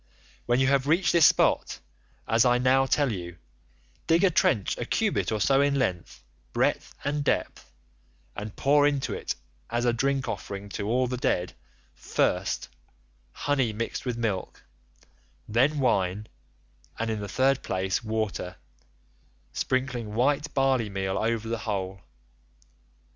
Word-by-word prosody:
"'When 120 +1 +3
you 130 - +3
have 135 0 +2
reached 165 +2 +3
this 170 -2 +7
spot, - - +2 0.5
as 115 +1 +4
I 125 -1 +4
now 130 +2 +3
tell 140 -1 +2
you, 85 -4 -6 0.7
dig 165 +2 +4
a 190 - +5
trench 110 - +2
a - - -1
cubit 215 - 0
or 110 - -1
so 135 +6 +3
in 140 0 +2
length, 90 -10 -2 0.3
breadth, - - 0
and 145 +1 -1
depth, - - -2 0.6
and 105 0 -6
pour 145 +1 +4
into 140 -2 -1
it - - -3 0.3
as 120 +1 -1
a 120 - +3
drink 135 +2 0
offering 100 0 -5
to 100 +1 -4
all 125 +3 +2
the 125 0 -3
dead, 90 -7 0 0.4
first, - - -1 0.6
honey 135 - 0
mixed 115 +2 -4
with 125 -2 -3
milk, 105 -6 -3 0.8
then 130 +8 +2
wine, 100 -5 +1 0.7
and 115 0 -1
in 110 - -2
the 100 -1 -6
third 135 +1 +2
place 95 +3 -1
water—sprinkling 110 - -5
white 145 +5 +1
barley 135 -5 +2
meal 95 -1 -2
over 115 0 -1
the 115 0 -2
whole. 95 -4 -4
120 Hz, 140 wpm, -27 LUFS, 105-135 Hz, 0.8 s, this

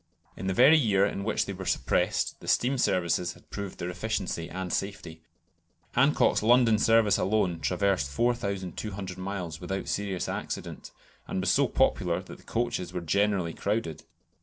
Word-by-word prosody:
In 95 - -5
the 95 - +1
very 140 +8 +7
year 100 -7 +3
in 100 -1 -3
which 110 - 0
they 100 - -5
were 95 0 -7
suppressed - - 0
the - - -12
steam 130 +2 +2
services 90 -3 +1
had 90 - -20
proved 100 -2 -6
their 90 +1 -4
efficiency 90 -3 -3
and 95 -1 -4
safety. 95 -5 -4 0.7
Hancock's 135 +4 +3
London 115 -1 +4
service 115 -2 +4
alone 95 -5 +1
traversed 95 -5 0
4200 100 - -2
miles 90 -5 -5
without 95 +2 -4
serious 100 -3 -2
accident, - - -5 0.4
and - - -2
was 95 -1 +1
so - - +3
popular - - +1
that - - -11
the - - -19
coaches 115 -7 -2
were 90 -1 -4
generally 95 0 +1
crowded. 100 -7 -2
100 Hz, 160 wpm, -28 LUFS, 90-110 Hz, 0.7 s, very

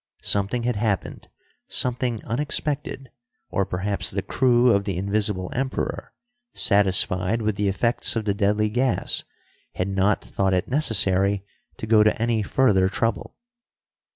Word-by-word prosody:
Something 100 +4 0
had 120 -2 -1
happened, 105 -3 -3 0.4
something 125 -2 -1
unexpected 140 +1 -3 0.4
or 100 - 0
perhaps 95 0 -2
the 95 0 -3
crew 125 -1 +3
of 100 -2 +2
the 95 -4 -3
Invisible 100 -1 -1
Emperor, 130 +1 -4 0.4
satisfied 100 +1 +2
with 110 -1 0
the 100 +1 -1
effects 115 +6 +1
of 110 -2 -2
the 100 - +1
deadly 105 +1 +1
gas, 125 +2 0 0.5
had 90 +2 -2
not 95 +1 +1
thought 95 -1 0
it 90 - -1
necessary 100 -7 +2 0.3
to - - -6
go 110 -1 +4
to 110 +1 +2
any 115 -1 0
further 100 -4 +2
trouble. 115 +2 -2
105 Hz, 135 wpm, -23 LUFS, 100-120 Hz, 0.5 s, go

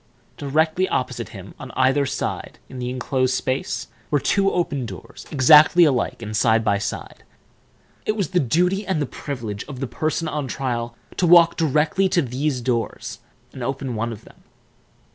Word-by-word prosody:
Directly 160 +6 +1
opposite 125 -3 -2
him, 100 -3 -10
on 135 - -7
the 125 - -12
other 135 +2 +3
side - - -4
of 130 - -7
the 125 0 -3
inclosed 130 0 0
space, 130 +1 -2 0.2
were 145 - +2
two 195 +7 +2 0.4
doors, 95 -3 -10
exactly 150 +4 +7
alike 130 -6 +1
and 105 0 -5
side 110 0 +3
by 100 -2 +2
side. 100 - -5 0.8
It 215 - +2
was 200 -4 -1
the 180 - +3
duty 180 - +1
and 190 -6 -1
the 145 - 0
privilege 120 -7 -5
of 140 -3 -8
the 135 - -2
person 155 +5 -2
on 150 -3 -3
trial 120 -3 -3 0.2
to 180 - +2
walk 170 0 +7
directly 160 +5 +2
to 180 -3 +2
these 130 +1 -2
doors 120 -3 -2 0.3
and 130 - -8
open 135 0 -3
one 115 +1 -2
of 115 0 -9
them. - - -18
135 Hz, 170 wpm, -22 LUFS, 120-155 Hz, 0.8 s, exactly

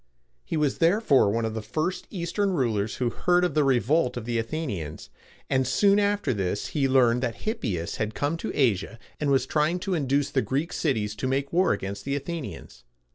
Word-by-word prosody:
He - - -3
was 150 -3 0
therefore 165 - +4
one 115 +2 0
of 110 - -2
the 110 - -3
first 155 - -3
Eastern 195 +2 -1
rulers 110 - 0
who 120 -2 -1
heard 180 0 +2
of 175 -4 +1
the 150 - +3
revolt 130 +1 +2
of 115 - -5
the 120 -1 -1
Athenians; 110 - -4 0.4
and 130 -1 +1
soon 200 0 +4
after 205 -8 +1
this 100 -1 -2
he 140 -3 +1
learned 125 -2 +4
that 120 -3 -3
Hippias 105 - -2
had 110 0 -2
come 145 +3 0
to - - -4
Asia, 115 -4 +1 0.2
and 150 - 0
was 135 -1 +3
trying 155 +3 +1
to 195 0 -2
induce 140 -2 0
the 135 - +2
Greek 145 +7 -2
cities 110 -9 0
to 130 - -2
make 135 +2 -1
war 185 +2 +3
against 100 +1 -3
the 140 0 -2
Athenians. 145 - -6
135 Hz, 195 wpm, -26 LUFS, 115-165 Hz, 0.4 s, therefore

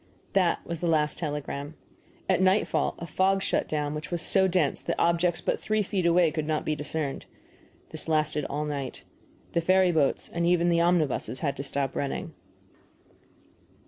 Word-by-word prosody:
That 185 -3 +2
was 170 -1 -4
the 175 - -1
last 155 -2 +1
telegram. 145 -1 -4 0.5
At 185 -1 +2
nightfall 190 +3 +2
a 170 - -6
fog 190 +4 +1
shut - - 0
down 150 -1 -1
which 150 0 -6
was 175 -2 -2
so 190 -1 +3
dense 175 -6 +1
that 170 - -2
objects 170 0 +2
but - - -1
three 215 0 0
feet 190 -3 0
away 170 -1 +4
could 155 -2 -3
not 155 -1 -1
be 155 - 0
discerned. 150 -1 -3 0.6
This - - -6
lasted 155 -1 +1
all 150 +2 -2
night. 140 -3 -5 0.5
The 170 - +1
ferry 185 +1 +4
boats 155 -5 +1
and 170 - -3
even 175 0 +3
the 170 -1 +3
omnibuses 165 -6 +1
had 140 -3 -1
to 140 - -4
stop 140 -1 -2
running. 140 - -3
165 Hz, 175 wpm, -27 LUFS, 150-180 Hz, 0.6 s, away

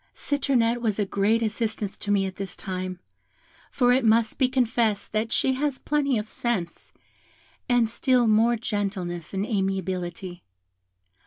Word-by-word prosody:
Citronette 245 -5 +1
was 220 -4 0
a 205 - +1
great 205 +4 +1
assistance 215 -2 -2
to 205 - -8
me 200 -1 +3
at 190 -1 -6
this 195 -2 -5
time; 185 -1 -5 0.7
for 245 -2 +3
it 260 0 +2
must 225 0 +3
be 260 -2 +3
confessed 235 -5 0
that 220 +1 -1
she 265 - +2
has 280 0 -1
plenty 280 -4 0
of 210 +1 -3
sense, 210 -8 -3 0.8
and 245 -2 +4
still 245 +2 +2
more 225 +2 +4
gentleness 195 -7 -3
and 195 +1 -1
amiability. 190 -3 -3
220 Hz, 145 wpm, -25 LUFS, 195-240 Hz, 0.8 s, and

